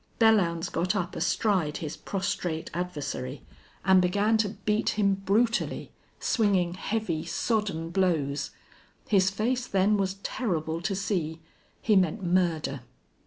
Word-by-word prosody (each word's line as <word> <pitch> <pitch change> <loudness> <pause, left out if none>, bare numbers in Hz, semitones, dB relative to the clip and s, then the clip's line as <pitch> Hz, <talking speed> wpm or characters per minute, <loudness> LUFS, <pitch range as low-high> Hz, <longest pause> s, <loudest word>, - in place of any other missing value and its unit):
Belllounds 190 -8 +3
got 185 +4 0
up 180 -3 -2
astride 185 -9 +1
his 155 -1 -5
prostrate 180 -4 -3
adversary 145 -6 -4 0.4
and 190 0 +6
began 205 +5 +2
to 215 -2 +1
beat 210 +1 -1
him 200 -2 +3
brutally, 205 +5 0 0.3
swinging 195 -6 +2
heavy, 190 -4 -2
sodden 195 -8 -1
blows. 160 -7 0 0.6
His 195 -3 +4
face 240 +5 -1
then 195 +2 +3
was 195 -1 0
terrible 165 -8 -2
to 195 +1 -1
see. 175 -5 -2 0.4
He 215 - +4
meant 185 0 +2
murder. 170 -6 +1
190 Hz, 120 wpm, -28 LUFS, 170-210 Hz, 0.6 s, and